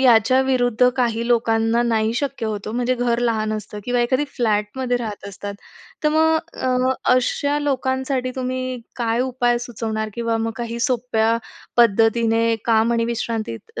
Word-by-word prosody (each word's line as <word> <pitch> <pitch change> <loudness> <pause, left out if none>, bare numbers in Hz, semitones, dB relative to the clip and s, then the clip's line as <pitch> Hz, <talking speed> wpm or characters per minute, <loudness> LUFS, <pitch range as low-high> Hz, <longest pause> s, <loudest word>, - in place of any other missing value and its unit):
याच्याविरुद्ध 250 0 +4
काही 235 -2 0
लोकांना 225 0 +2
नाही 225 -2 +1
शक्य 270 -2 -2
होतं 210 -1 -4
ओ. - - -6
म्हणजे 245 +1 0
घर 240 -1 0
लहान 220 -3 0
असतं 210 -1 -6
किंवा 245 0 +1
एखादी 260 +4 +1
फ्लॅटमध्ये 235 +2 0
राहत 220 -5 -5
असतात. 200 +1 -7 0.5
तर - - +5
मग 320 +1 +3 0.2
अ, 255 0 +1 0.2
अशा 285 +3 +1
लोकांसाठी 260 -2 -1
तुम्ही 255 -1 -3 0.2
काय 235 -1 0
उपाय 245 -2 +1
सुचवणार? 220 -2 -4
किंवा 230 -1 -1
मग 225 0 -2
काही 235 -1 -4
सोप्या 230 -2 +1 0.4
पद्धतीने 225 0 +4 0.2
काम 230 0 +3
आणि 230 0 +1
विश्रांतीत 225 - -4
235 Hz, 145 wpm, -21 LUFS, 225-255 Hz, 0.5 s, तर